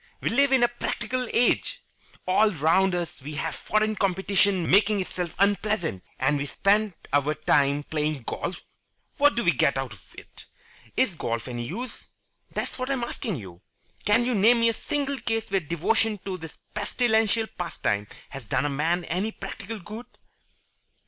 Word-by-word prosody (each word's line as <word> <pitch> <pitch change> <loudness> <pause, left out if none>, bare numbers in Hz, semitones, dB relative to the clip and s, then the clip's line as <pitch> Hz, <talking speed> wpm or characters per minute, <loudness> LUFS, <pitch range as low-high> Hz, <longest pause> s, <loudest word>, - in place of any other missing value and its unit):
We - - -1
live 275 +3 +3
in 260 -2 +5
a - - +7
practical 240 +1 -3
age. 245 - +2 0.4
All 200 +4 +4
round 180 +2 +3
us 170 -5 -4
we 145 +3 -7
see 145 - -2
foreign 215 0 0
competition 190 -2 +2
making 205 +1 +4
itself 180 -2 -4
unpleasant. 200 - +1
And 140 +2 +2
we 145 - -2
spend 205 +3 +2 0.2
our 145 +2 +2
time 145 -1 +2
playing 150 -3 -2
golf! - - -4 0.5
What 290 0 +5
do 235 - 0
we 170 - +5
get 140 -1 +2
out 135 -4 -3
of 100 - -18
it? - - -13 0.5
Is 235 -8 +3
golf 115 -6 -3
any 120 -1 -4
use? 240 - -7 0.4
That's - - -4
what 255 +1 -2
I'm 265 -3 0
asking 225 -4 -3
you. 95 - -9 0.4
Can 210 +4 +4
you 250 - +1
name 230 +3 +5
me 230 - +5
a - - 0
single 280 +2 -2
case 225 -3 -2
where 195 - +3
devotion 205 +7 0
to 190 -2 -2
this 160 -3 -9 0.2
pestilential 220 +1 +1
pastime 105 - -2 0.2
has 135 -5 -8
done - - +1
a - - +1
man 165 +5 0
any 190 +7 -1
practical 200 +2 -6
good?" 215 +5 -9
195 Hz, 170 wpm, -26 LUFS, 150-225 Hz, 0.5 s, a